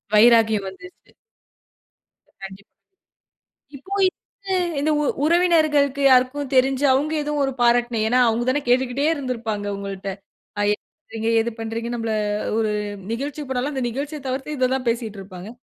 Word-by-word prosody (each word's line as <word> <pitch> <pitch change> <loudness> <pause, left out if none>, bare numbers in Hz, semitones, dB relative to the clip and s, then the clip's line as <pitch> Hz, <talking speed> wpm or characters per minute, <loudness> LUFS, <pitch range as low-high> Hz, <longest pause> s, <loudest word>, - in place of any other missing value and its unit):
வைராக்கியம் 220 -3 +5
வந்துருச்சு. 355 - -15 1.3
கண்டிப்பா. 195 +1 -9 1.1
இப்ப 275 +8 -13 0.9
இந்த 305 +2 0
உ - - 0 0.2
உறவினர்களுக்கு 310 -5 +3
யாருக்கும் 260 +2 +2
தெரிஞ்சு, 265 +2 +3
அவங்க 295 +4 0
ஏதோ 295 - -3
ஒரு 270 - 0
பாராட்டின 240 -1 +3
ஏன்னா 250 +2 +3
அவங்க 230 +1 +1
தானே 290 +3 +2
கேட்டுக்கிட்டே 255 +3 +1
இருந்திருப்பாங்க 230 -7 -4
உங்கள்ட்ட, 195 -1 -5 0.6
என்ன - - -8
பண்றீங்க? 225 -7 -4
எது 235 +1 -3
பண்றீங்க? 225 +1 -4
நம்மள 225 -1 -2 0.4
ஒரு 215 -1 +1 0.4
நிகழ்ச்சிக்கு 280 +3 -4
போனாலும் 260 +3 -1
அந்த 260 -2 -2
நிகழ்ச்சிய 285 +5 -5
தவிர்த்து, 265 +3 -3
இத 255 0 +1
தான் 255 -2 -4
பேசிட்டுருப்பாங்க. 200 -5 -5
250 Hz, 125 wpm, -22 LUFS, 225-280 Hz, 1.3 s, வைராக்கியம்